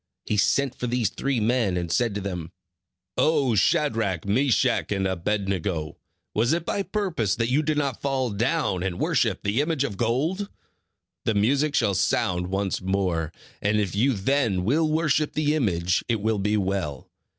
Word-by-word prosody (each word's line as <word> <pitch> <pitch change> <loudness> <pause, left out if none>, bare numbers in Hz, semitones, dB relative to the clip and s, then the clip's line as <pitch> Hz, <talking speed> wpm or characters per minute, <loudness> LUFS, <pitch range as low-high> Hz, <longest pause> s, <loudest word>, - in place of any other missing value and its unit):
He 105 - -1
sent 135 +5 +2
for 125 - -4
these 120 -4 0
three 135 -3 -1
men 110 -4 +1
and 85 -2 -3
said 115 +3 +1
to 105 - -2
them: 90 -4 -5 0.7
"O 145 -6 +3
Shadrach, 105 - +1
Meshach, 120 +4 +2
and 95 -1 0
Abed 95 +2 -1
nego, 85 -5 -2 0.4
was 120 +7 +2
it 170 0 -1
by 200 - -1
purpose 180 - -1
that 115 +1 -1
you 140 +4 +3
did 155 0 -1
not 140 -4 -1
fall 135 -3 0
down 115 - 0
and 90 -1 -2
worship - - +1
the 105 +6 +1
image 150 -2 0
of 110 -9 -3
gold? 155 - 0 0.8
The 110 - +1
music 140 +8 +2
shall 110 -7 +2
sound 90 -1 +1
once 95 +1 -1
more, 90 -4 -1 0.3
and 105 +1 +2
if 100 -4 -1
you 130 +6 +3
then 110 -3 +1
will 155 - +2
worship 155 -1 +1
the 150 0 +1
image, 90 - +1
it 115 -2 +1
will 110 0 0
be 105 +2 +1
well. 95 -8 -2
110 Hz, 175 wpm, -25 LUFS, 95-140 Hz, 0.8 s, O